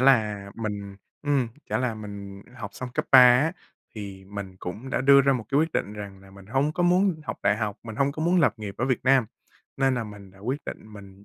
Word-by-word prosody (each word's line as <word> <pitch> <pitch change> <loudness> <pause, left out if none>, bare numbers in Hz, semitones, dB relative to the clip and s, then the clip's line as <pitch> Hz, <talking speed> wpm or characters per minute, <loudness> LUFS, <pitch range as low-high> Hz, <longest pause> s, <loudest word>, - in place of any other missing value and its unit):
là 105 -6 +3
mình 100 -3 -5 0.3
ừm, 140 -5 +1 0.2
chả - - 0
là 125 -3 -1
mình 100 -2 -8
học 105 -5 -6
xong 130 - -5
cấp - - 0
3 130 - +11
á, 125 +6 +6 0.4
thì 100 -2 -8
mình 95 -1 -7
cũng 105 +9 -7
đã - - 0
đưa 140 +1 +7
ra 140 0 +3
một 125 -4 -2
cái 140 +1 +3
quyết 160 0 0
định 100 - -1
rằng 100 -2 -8
là 95 0 -16
mình 100 0 -14
hông 135 +6 +1
có 175 - -1
muốn 180 -1 +3
học - - -5
đại 100 - +3
học, 105 -2 -3
mình 110 -2 -8
hông 140 +2 +2
có 155 - -4
muốn 175 +2 +3
lập 120 -10 +3
nghiệp 105 -3 -6
ở 120 - +1
Việt 130 -3 -1
Nam, 130 -3 +4 0.5
nên 135 -1 +2
là 120 -2 -2
mình 100 -2 -11
đã 95 - -20
quyết 130 +8 -3
định 110 - -8
mình 100 -1 -13
110 Hz, 245 wpm, -26 LUFS, 100-135 Hz, 0.5 s, 3